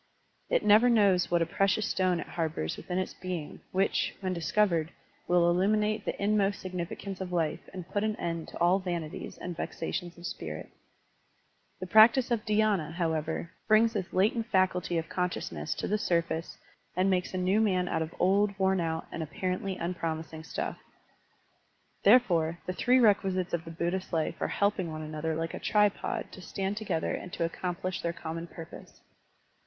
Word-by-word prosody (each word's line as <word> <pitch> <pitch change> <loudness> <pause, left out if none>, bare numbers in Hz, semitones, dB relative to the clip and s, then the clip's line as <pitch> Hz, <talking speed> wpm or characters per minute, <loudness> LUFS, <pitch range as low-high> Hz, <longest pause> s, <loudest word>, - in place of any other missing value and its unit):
It - - +2
never 215 +4 +7
knows 200 -6 +4
what 170 -1 +3
a - - -1
precious 195 +5 +1
stone 185 -2 +1
it - - -4
harbors 160 - -2
within 180 - -4
its 185 - -2
being, 180 -5 -6
which, 195 +1 +1
when 185 -2 -2
discov 185 +5 +2
ered, 165 -2 0 0.4
will 175 -1 +4
illuminate 210 +4 +2
the - - -3
inmost 200 -1 +2
significance 185 +1 -5
of 185 -1 -4
life 165 -3 0
and 185 -3 -7
put 205 +2 -1
an 215 -1 0
end 165 -4 -3
to - - -9
all 175 +3 +4
vanities 170 -4 -5
and 180 -1 -5
vexations 175 +1 -4
of 175 - -10
spirit. 185 - -6 1.1
The 185 - -4
practice 230 +6 +6
of 230 -3 0
dhy^na, 210 -7 +2
however, 160 -1 -2 0.2
brings 225 +1 +5
this 190 -4 -3
latent 220 +4 +2
faculty 185 -4 +1
of 165 - -2
consciousness 130 - -2
to - - -3
the 210 +1 +1
surface 170 -3 -1 0.4
and 185 +2 +2
makes 185 -1 0
a - - 0
new 185 +4 +2
man 185 -4 +2
out - - 0
of 160 +1 -4
old, 200 +2 +3
worn 190 -1 +2
out, 160 -1 -2
and 170 - -4
apparently 185 +4 -2
unpromising 165 -2 -4
stuff. - - -4 1.2
Therefore, 175 -8 +4
the 185 - -2
three 250 +7 +3
requisites 195 -5 +2
of 170 -1 -1
the - - -7
Buddhist 175 +3 -2
life 160 -3 -1
are - - +1
helping 200 -4 0
one 155 0 -5
another 155 +1 -3
like 165 +1 -3
a - - -5
tripod 210 -1 +1
to 185 - -10
stand 195 +2 -3
together 205 -7 -1
and 180 - -5
to 170 - 0
accomplish 180 +2 -3
their 170 0 -1
common 165 0 -5
pur 165 -1 -9
pose. 170 - -13
185 Hz, 175 wpm, -29 LUFS, 170-200 Hz, 1.2 s, never